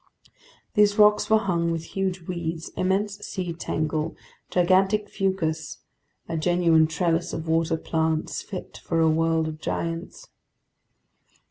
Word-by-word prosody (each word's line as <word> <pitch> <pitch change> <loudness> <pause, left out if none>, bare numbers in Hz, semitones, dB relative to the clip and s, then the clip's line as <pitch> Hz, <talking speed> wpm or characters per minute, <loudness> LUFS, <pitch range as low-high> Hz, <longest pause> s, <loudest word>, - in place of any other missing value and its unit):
These 210 0 +4
rocks 210 0 +5
were 220 - +6
hung 175 -5 0
with 165 -1 -2
huge 190 -2 -1
weeds, 170 -2 -4
immense 195 +2 -1
sea 180 -3 -4
tangle, 155 -1 -2 0.3
gigantic 190 +4 +3
fucus—a 165 -3 -4
genuine 165 -1 +3
trellis 165 +1 0
of 160 0 -4
water 165 0 +1
plants 160 0 -1
fit 190 -4 -8
for 165 - 0
a 160 - +4
world 160 0 +2
of 155 -1 -6
giants. 170 - -4
170 Hz, 120 wpm, -25 LUFS, 160-190 Hz, 0.3 s, were